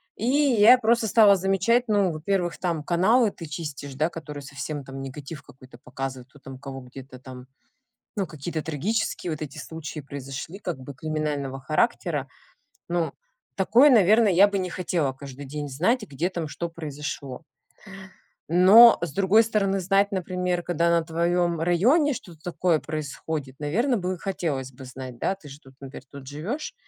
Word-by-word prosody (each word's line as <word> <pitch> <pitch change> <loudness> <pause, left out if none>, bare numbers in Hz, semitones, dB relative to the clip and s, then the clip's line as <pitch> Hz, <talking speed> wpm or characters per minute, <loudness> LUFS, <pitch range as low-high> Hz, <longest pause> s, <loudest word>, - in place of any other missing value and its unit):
И 225 - -3
я 255 -4 +6
просто 235 -1 +2
стала 210 -2 +6
замечать 195 +6 +1
ну, 200 -4 +2
во-первых, 175 +2 -2
там 170 -4 -2
каналы 205 +7 +3
ты 165 - -9
чистишь, 145 -3 -6
да, 155 +4 +1
которые 150 -3 -8
совсем 140 +1 -6
там 135 +1 -8
негатив 140 +2 -8
какой-то 130 -2 -16
показывают, 130 0 -6
кто 145 - -19
там 135 -1 -10
кого 135 -1 -8
где-то 130 +1 -12
там, 130 0 -11 0.7
ну, 195 -3 -1
какие-то 155 +1 -5
трагические 170 +3 -2
вот 155 - -5
эти 150 0 -7
случаи 155 +1 -7
произошли, 140 +5 -7
как 175 -8 -5
бы 140 +2 -9
криминального 145 -2 -3
характера. 155 - 0 0.6
Ну, 170 -1 -1 0.4
такое, 235 +9 +5
наверное, 215 -1 +5
я 195 +4 +6
бы 200 -1 -2
не 185 -1 -3
хотела 170 -6 -1
каждый 140 0 -10
день 145 +1 -5
знать, 185 - +1
где 170 -2 -2
там 170 -4 -4
что 170 +4 -4
произошло. 150 -4 -6 1.1
Но, 200 +7 +8
с 165 -5 -3
другой 200 +5 +4
стороны, 200 -3 0
знать, 195 +2 +2
например, 180 -1 -2
когда 170 -1 0
на 170 -1 +2
твоём 170 0 0
районе 250 - +3
что-то 170 -8 -11
такое 175 -2 +1
происходит, 150 -2 -5
наверно, 230 - +1
бы 185 -1 -3
хотелось 150 -9 -3
бы 130 +1 -12
знать, 130 -1 -9
да. 195 - 0
Ты 165 -7 -14
же 140 - -11
тут, 135 0 -18
например, 135 0 -10
тут 140 -2 -11
живёшь 190 - -5
165 Hz, 165 wpm, -25 LUFS, 140-195 Hz, 1.1 s, Но